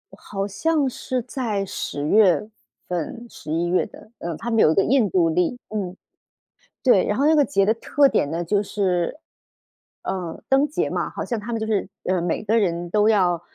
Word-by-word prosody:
好 195 0 -4
像 300 +7 +1
是 255 0 -3
在 220 -8 -2
十 145 -5 -4
月 210 0 +4 0.4
份、 180 +7 -4
十 150 - -9
一 165 +2 0
月 180 +1 +1
的， 215 - -16
呃， 170 -2 -4
他 235 - -4
们 225 - +2
有 155 - +6
一 - - 0
个 195 - +4
印 240 -5 +3
度 170 -2 +3
历， 180 +8 0
嗯。 195 -4 -4 0.9
对， 245 -8 +5
然 210 - 0
后 280 - +2
那 310 - +5
个 295 -3 +4
节 200 -8 +2
的 220 - +3
特 275 +4 +3
点 145 - +1
呢， 165 +2 -2
就 200 +4 +1
是 190 - -1 0.8
呃， 175 -4 -4
灯 270 +2 +4
节 295 - -1
嘛， - - -2
好 - - -5
像 235 -3 -3
他 230 +3 -5
们 - - 0
就 - - -1
是， 215 -2 0 0.2
呃， 185 -1 0
每 170 +3 -1
个 220 +2 +2
人 175 -3 -1
都 210 +4 +3
要， 180 -6 +3
205 Hz, 215 characters per minute, -23 LUFS, 175-230 Hz, 0.9 s, 有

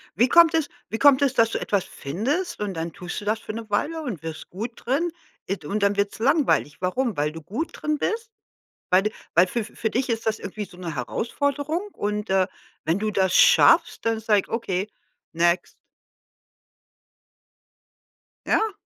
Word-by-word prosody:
Wie 240 +6 +4
kommt 335 +3 +6
es 320 -3 +1 0.2
wie 220 - -2
kommt 285 -1 +6
es, 275 -2 +3
dass 230 -3 +3
du - - -1
etwas 200 -3 0
findest, 255 - -3
und 205 -2 -2
dann 165 0 -4
tust 180 +1 -6
du - - -9
das 215 +2 0
für 215 - -7
'ne 225 -1 -7
Weile 315 +10 -1
und 220 - -5
wirst 160 -1 -7
gut 220 +7 -5
drin 310 +7 -1 0.4
id 195 -5 -3
und 205 +6 -1
dann 200 0 +3
wird's 200 +1 -1
langweilig. 265 - +2
Warum? 220 +5 0
Weil 150 +1 +1
du 160 +1 -9
gut 255 - -4
drin 300 0 -2
bist? 455 +7 -2 0.6
Weil 185 +2 +5
du 215 - +1 0.2
weil 175 +3 +6
fü 225 +4 -2
für 220 +1 -4
dich 255 +2 -1
ist 225 0 -2
das 220 0 +1
irgendwie 210 +2 -5
so 175 - -16
'ne 175 -3 -5
Herausforderung 285 - -2
und, 210 0 -3
äh, 190 -1 +3 0.4
wenn 165 +5 +1
du 215 +1 -1
das 190 -3 +1
schaffst, - - +5
dann 225 -1 0
sag 215 -2 +3
ich: - - -15
„Okay, 205 -4 -2 0.4
next.“ 170 +2 +1 2.7
Ja. 440 -1 +2
215 Hz, 180 wpm, -24 LUFS, 185-275 Hz, 2.7 s, kommt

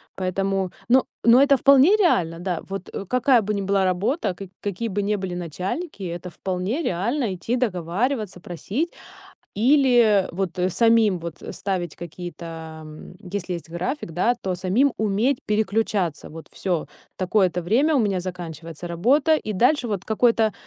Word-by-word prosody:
Поэтому. 190 0 -1 0.2
Ну 255 +1 +5 0.2
ну 235 +2 +7
это 280 0 +6
вполне 280 - +6
реально, 175 - +2
да. 175 -2 -2
Вот, 195 -1 -6
э, 195 - -5
какая 250 +2 +3
бы 210 +1 -2
ни 200 - -1
была 195 0 +1
работа, 190 - 0
ка 195 +1 -8
какие 205 +3 -3
бы 205 +1 -1
не 205 +1 0
были 190 -2 -4
начальники, 185 - -5
и 180 - -3
это 175 +1 -6
вполне 190 - -3
реально- 215 - -1
идти 230 +7 -2
договариваться, 210 - -1
просить 205 - -3 0.6
или 240 -5 +4
вот 190 +1 -2 0.2
самим 225 -2 +3
вот 170 -1 -8
ставить 180 -5 -3
какие-то, 165 -2 -8
м, 155 +3 -11
если 185 -2 -4
есть 165 -2 -7
график, 175 - -4
да, 230 +9 +2
то 185 -1 -2
самим 195 +10 +2
уметь 220 +5 +1
переключаться. 210 -5 0
Вот 160 +1 -10
всё. 175 -6 -2 0.3
Такое-то 185 -1 +1
время 265 - +2
у - - +4
меня 200 -5 +1
заканчивается 170 -2 -7
работа, 265 - +3
и 215 -8 -2
дальше 245 +5 +2
вот 200 -3 -3
какой-то 225 -1 +2
195 Hz, 155 wpm, -23 LUFS, 180-235 Hz, 0.6 s, ну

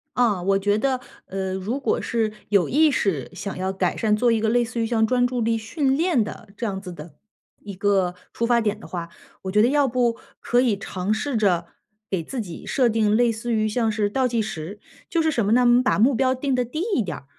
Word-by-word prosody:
啊， 220 -7 +2
我 195 +2 +2
觉 205 +1 +1
得， 260 +2 0 0.3
呃， 190 0 -3
如 205 +9 -3
果 - - 0
是 225 -2 -1 0.2
有 200 -4 +3
意 310 +4 +4
识 195 - -1
想 195 +2 -5
要 190 +1 -1
改 190 -2 -1
善， 215 -1 +1
做 235 +2 +2
一 225 -1 +1
个 220 - +1
类 240 +1 +3
似 230 0 -5
于 - - +1
像 225 -1 +2
专 245 +1 +2
注 245 -1 -2
力 225 0 +1
训 265 +5 0
练 325 -9 +2
的 215 0 -9
这 235 - -3
样 195 -3 -3
子 180 - -8
的 160 -2 -10 0.5
一 200 -1 -8
个 190 -2 +1 0.2
出 230 - -1
发 235 0 +3
点 215 -1 -1
的 - - -11
话， 170 -2 -5 0.3
我 190 - -3
觉 210 +2 +4
得 235 - +5
要 285 0 +3
不 240 -1 +1 0.2
可 245 +1 +2
以 230 -6 +1
尝 195 +1 -2
试 235 +3 -2
着， 190 -5 +1 0.4
给 180 -4 -1
自 245 +7 -4
己 175 -5 -8
设 255 -3 +2
定 215 -1 +2
类 240 0 +3
似 230 +2 -3
于 215 0 +1
像 225 0 0
是 210 -1 0
倒 260 +4 +1
计 235 -2 0
时。 200 -1 -6 0.3
就 335 - +1
是 320 - +2
什 235 -8 0
么 205 - +1
呢？ 250 +2 +5
我 - - +3
们 245 +1 +5
把 255 - +1
目 255 +4 +4
标 260 +1 +2
定 260 0 -1
得 250 - 0
低 310 +8 -4
一 230 - +2
点 170 -5 -5
儿， - - -14
220 Hz, 270 characters per minute, -23 LUFS, 195-245 Hz, 0.5 s, 得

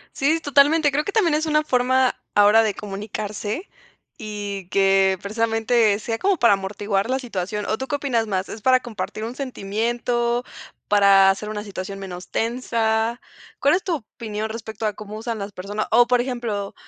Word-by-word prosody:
Sí, 310 +4 +2
totalmente. 290 +1 +4
Creo 295 +2 0
que 405 - -4
también 365 -8 +3
es 310 +1 0
una 305 0 +2
forma 255 -1 +2 0.2
ahora 205 +2 +6
de 215 -2 0
comunicarse 210 - -5 0.5
y 205 -3 -6
que, 195 0 +3
precisamente, 225 0 +1
sea 225 +1 -3
como 390 +5 +2
para 235 -5 +5
amortiguar 200 +1 -1
la 260 +1 +1
situación. 210 -4 -4
¿O 215 - -1
tú 265 - -5
qué 290 - 0
opinas 245 -6 0
más? 190 -2 -2
¿Es 220 - -7
para 255 +3 +4
compartir 215 -2 -5
un 235 +2 -5
sentimiento, 240 0 -1 0.4
para 200 -1 +6
hacer 200 +2 -3
una 210 -1 -4
situación 195 -1 -6
menos 185 -2 -8
tensa? 230 0 0 0.4
¿Cuál 285 - +3
es 370 - 0
tu 355 - 0
opinión 220 -3 -6
respecto 225 0 -6
a 215 - +1
cómo 210 +1 -9
usan 225 +1 -4
las 200 0 -6
personas? 205 +4 -4
O, 240 +2 +6
por 250 0 +3
ejemplo, 235 -6 -3
220 Hz, 175 wpm, -22 LUFS, 205-250 Hz, 0.5 s, ahora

